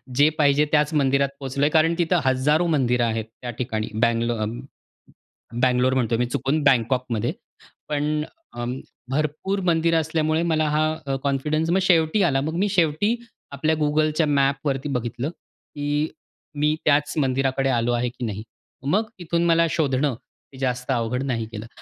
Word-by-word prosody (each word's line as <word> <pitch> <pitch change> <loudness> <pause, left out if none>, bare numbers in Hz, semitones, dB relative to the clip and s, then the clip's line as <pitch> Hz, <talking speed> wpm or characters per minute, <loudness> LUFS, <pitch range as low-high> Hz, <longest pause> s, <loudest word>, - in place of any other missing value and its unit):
जे 145 +3 +5
पाहिजे 145 0 +4
त्याच 150 0 +2
मंदिरात 140 -1 +2
पोहोचलोय. 140 +2 0
कारण 160 +2 +3
तिथं 175 +1 +2
हजारो 145 +6 +2
मंदिरं 125 -6 +2
आहेत 110 -1 -2 0.2
त्या 125 - -5
ठिकाणी. 110 -4 -2
बंगलो 115 0 +2
अ, 110 -1 -2 1.2
बंगलोर 125 +1 +3
म्हणतोय 120 -3 +1
मी 125 - +1
चुकून, 135 +5 -1
बँकॉकमध्ये. 125 -3 +1 0.6
पण 150 +1 0 0.3
अ, 120 - -3 0.5
भरपूर 155 +8 -1
मंदिर 165 0 +2
असल्यामुळे 160 0 0
मला 155 -1 +2
हा 155 +1 +2 0.2
अ, 135 -1 -1
कॉन्फिडन्स 150 +4 0
मग 180 - +3
शेवटी 170 +2 +3
आला. 140 -7 +2
मग 155 +4 -3
मी 200 +3 +1
शेवटी 180 +5 +2 0.4
आपल्या 155 +3 +1
गुगलच्या 155 +1 +1
मॅपवरती 140 -1 0
बघितलं, 125 +1 -3
की 145 -2 -4 0.5
"मी 150 +1 +2
त्याच 150 -1 +3
मंदिराकडे 135 -1 +1
आलो 120 -1 +1
आहे 120 +1 0
की 120 +1 -7
नाही?" 105 -1 -4 0.5
मग 215 +2 +1
इथून 170 -1 -1
मला 165 0 +4
शोधणं, 140 -2 +1 0.4
हे 130 - -13
जास्त 125 -1 -2
अवघड 120 +1 -1
नाही 120 -4 -1
गेलं. 105 +1 -6
145 Hz, 150 wpm, -23 LUFS, 125-155 Hz, 1.2 s, जे